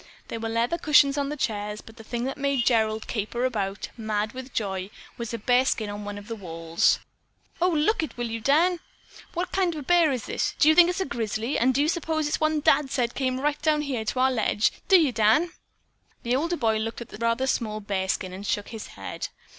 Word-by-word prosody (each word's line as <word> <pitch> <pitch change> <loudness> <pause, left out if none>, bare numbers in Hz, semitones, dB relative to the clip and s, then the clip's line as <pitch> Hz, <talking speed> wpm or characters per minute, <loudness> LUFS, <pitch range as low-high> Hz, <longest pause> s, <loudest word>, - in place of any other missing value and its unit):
There 230 - -4
were 225 0 -3
leather 235 +9 0
cushions 295 -3 +5
in 280 -1 -1
the 300 - -4
chairs, 210 -4 -2
but 225 +2 -14
the 225 - -11
thing 235 +2 -4
that 270 +1 -2
made 280 -3 0
Gerald 220 -2 +2
caper 235 +3 -2
about, 200 -5 -2
mad 215 -1 -2
with 260 +1 -8
joy, 190 -4 -3 0.3
was 235 -2 -5
a 230 - -3
bearskin 245 -2 +1
on 205 0 -6
one 205 0 -5
of 205 0 -10
the 230 - -4
walls. 165 -4 +1 0.6
"Oh, 360 - +4
look 330 +6 +2
it, 315 - -5
will 240 - -2
you, 230 0 -4
Dan? 335 +8 +3 0.6
What 355 +2 -2
kind 365 -3 +1
of 300 - -5
a - - -8
bear 340 0 +4
is 250 -5 -3
it? - - -1
Do 305 - +5
you - - +7
think 345 +1 +7
it 360 - -1
is - - -2
a - - 0
grizzly, 230 0 -2
and 255 +3 +4
do 265 +2 +1
you - - +1
s'pose 320 -2 -1
it's 295 - 0
that - - -22
one 310 -1 +2
Dad 300 -2 +3
said 245 -3 0
came 255 -1 -1
right 295 +2 -1
down 305 -1 +2
here 260 -6 -2
to 255 - -2
our 265 0 +4
ledge? 220 -3 +1 0.2
Do 380 -2 +7
you, 305 -5 +3
Dan?" 230 +10 +3 0.7
The 240 +1 +1
older 335 +5 0
boy 225 -5 +1
looked 225 +2 -4
at 235 - -8
the - - -9
rather 230 +2 +1
small 220 -5 -1
bearskin 190 -2 -2
and 190 +2 -7
shook 205 0 -1
his 225 -2 -7
head. - - -5
240 Hz, 240 wpm, -26 LUFS, 215-295 Hz, 0.7 s, you